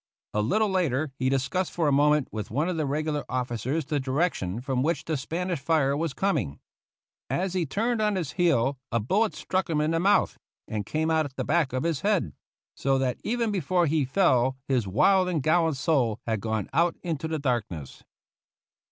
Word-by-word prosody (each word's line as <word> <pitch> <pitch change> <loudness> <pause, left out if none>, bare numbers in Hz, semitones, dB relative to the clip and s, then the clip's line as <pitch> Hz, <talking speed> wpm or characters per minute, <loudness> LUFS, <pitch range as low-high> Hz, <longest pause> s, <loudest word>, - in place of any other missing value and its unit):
A 105 - +1
little 215 - +2
later 155 -6 0
he 130 0 +1
discussed 140 +8 0
for 165 -3 +1
a - - +3
moment 150 0 +3
with 105 -2 -5
one 145 +9 0
of 180 - -1
the 155 -3 -1
regular 150 +1 -1
officers 130 +4 -2
the 145 0 -1
direction 130 - -1
from 130 0 -1
which 165 +5 0
the 160 - -1
Spanish 170 +5 -3
fire 140 -2 +2
was 155 -1 -2
coming. 140 - -1 0.7
As 185 0 -1
he 180 -4 0
turned 225 - 0
on 210 -1 +2
his 170 -7 -2
heel 140 -7 +1
a 115 - +2
bullet 200 - +1
struck 185 0 -2
him 155 -2 +1
in 150 +1 +1
the 165 - +1
mouth 195 +4 +2 0.3
and 105 -2 -4
came 160 +1 0
out 160 -1 +2
at 135 -2 -9
the - - -3
back 160 -3 +2
of 130 +2 -2
his 165 -4 -1
head; 195 - +1 0.4
so 135 0 +1
that 130 -2 -1
even 230 -1 0
before 180 -1 +1
he 155 -1 +1
fell 130 -4 +2
his 125 -6 +1
wild 185 - +3
and 160 -6 -1
gallant 160 -1 +2
soul 130 -7 +1
had 110 -3 -1
gone 110 -2 -2
out 170 0 +2
into 160 -3 -2
the 160 0 -2
darkness. 115 - -3
150 Hz, 195 wpm, -26 LUFS, 130-175 Hz, 0.7 s, a